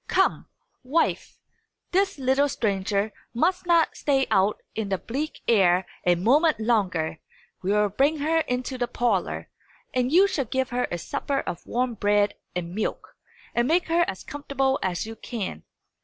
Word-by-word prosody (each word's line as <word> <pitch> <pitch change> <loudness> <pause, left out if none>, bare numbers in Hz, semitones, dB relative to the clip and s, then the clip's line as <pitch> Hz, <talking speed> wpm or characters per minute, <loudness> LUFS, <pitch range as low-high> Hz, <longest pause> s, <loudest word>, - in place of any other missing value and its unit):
Come, - - +1 0.3
wife; 285 +6 0 0.5
this 385 -1 +2
little 270 +2 +2
stranger 200 -3 -1 0.2
must 360 +8 +1
not 335 -2 +3
stay 270 -2 +1
out 200 0 +3
in 220 -2 -3
the 190 - +1
bleak 280 - -4
air 185 -4 +4 0.2
a 175 - +6
moment 275 - +3
longer. 185 -9 0 0.4
We 190 +2 0
will 210 0 +3
bring 275 +10 +2
her 315 +3 +1
into 255 -3 -2
the 245 - 0
parlour; 240 0 -1 0.5
and 250 0 +1
you 365 +5 +7
shall 320 -9 -1
give 260 +2 -1
her 250 0 0
a 175 - -2
supper 275 - -2
of 170 - -6
warm 250 0 0
bread 205 -1 +2 0.2
and 175 -1 -3
milk, 215 +2 -3 0.4
and 240 +1 +2
make 345 +3 +2
her 340 +1 +4
as 190 - -5
comfortable 275 -2 -1
as 180 0 -1
you 225 0 -7
can. 200 - -5
245 Hz, 160 wpm, -25 LUFS, 200-285 Hz, 0.5 s, you